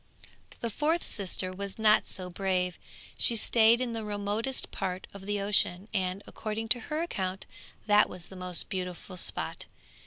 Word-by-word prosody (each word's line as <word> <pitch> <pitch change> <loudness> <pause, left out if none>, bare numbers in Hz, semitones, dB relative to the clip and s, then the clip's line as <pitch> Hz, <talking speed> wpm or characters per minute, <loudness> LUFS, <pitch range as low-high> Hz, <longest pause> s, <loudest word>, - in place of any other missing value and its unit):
The 235 - -2
fourth 315 +8 +1
sister 185 -2 -1
was 200 +1 -5
not 215 -1 +5
so 185 -1 -1
brave; 180 -1 0 0.4
she 235 - +4
stayed 225 +1 +5
in 250 -2 -1
the 225 -1 -3
remotest 210 +5 -1
part 185 -1 -3
of 200 0 -10
the 205 0 0
ocean, 195 -1 +1
and, 190 0 0
according 220 +1 -4
to 240 - +6
her 310 +2 0
account, 190 - -3 0.4
that 210 -1 +5
was 180 -2 -8
the 190 - -10
most 180 -1 +1
beautiful 180 0 -5
spot. 180 - -2
200 Hz, 160 wpm, -30 LUFS, 185-225 Hz, 0.4 s, to